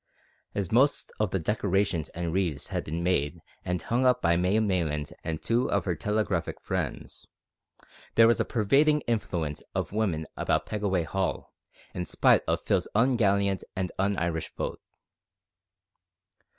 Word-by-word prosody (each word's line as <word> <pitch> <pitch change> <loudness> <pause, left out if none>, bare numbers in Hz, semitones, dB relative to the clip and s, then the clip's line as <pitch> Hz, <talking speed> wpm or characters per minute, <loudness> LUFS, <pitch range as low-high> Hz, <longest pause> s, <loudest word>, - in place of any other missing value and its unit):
As 100 -4 -2
most 135 +5 +3
of 105 -2 +1
the 95 - 0
decorations 95 -2 0
and 85 -1 -4
wreaths 90 -7 -1
had - - -2
been 80 +3 -4
made 85 -2 0 0.2
and 90 0 -1
hung 120 +3 +1
up 125 -1 +4
by 85 -4 +3
May 90 +4 +2
Maylands 85 -8 -1
and 80 -1 -3
two 120 +2 +1
of - - 0
her 90 - +1
telegraphic 105 +4 -1
friends, - - -4 0.9
there 115 0 +7
was 115 - +3
a - - +3
pervading 140 +7 +3
influence 85 - -2
of - - -1
woman 95 -7 0
about - - 0
Pegaway 100 -4 0
Hall, 95 +3 -2 0.4
in 90 - -3
spite - - +4
of - - -1
Phil's - - +1
ungallant 100 -5 +2
and 95 -1 -2
un 100 0 +1
Irish 85 -1 -2
vote. - - -4
95 Hz, 150 wpm, -28 LUFS, 85-110 Hz, 0.9 s, there